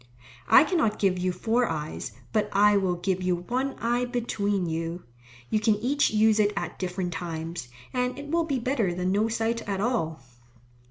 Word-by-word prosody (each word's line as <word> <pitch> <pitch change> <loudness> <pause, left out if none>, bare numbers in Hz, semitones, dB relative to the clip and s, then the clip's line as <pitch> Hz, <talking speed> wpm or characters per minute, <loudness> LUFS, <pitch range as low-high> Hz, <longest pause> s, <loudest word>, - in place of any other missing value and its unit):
I - - +9
cannot 310 - +1
give 190 -2 +1
you 185 0 0
four 230 +6 +1
eyes, 155 -1 -4 0.2
but 210 -1 +1
I 205 +1 +5
will 190 -3 +1
give 185 +1 -1
you 180 -1 +1
one 250 +10 -2
eye 240 +2 0
between 205 -6 -1
you. 165 +1 -3 0.5
You 215 - +3
can 215 0 +3
each 260 +7 +1
use 215 0 +3
it 210 -1 +4
at 175 0 -4
different 180 -1 -3
times, 165 -3 -5 0.3
and 250 0 -1
it 290 +1 -7
will 335 0 +2
be 280 -4 -1
better 235 -7 0
than 180 +1 -1
no 210 +3 +2
sight 225 +1 -1
at 195 -1 -1
all. 195 - -1
205 Hz, 180 wpm, -27 LUFS, 180-240 Hz, 0.5 s, I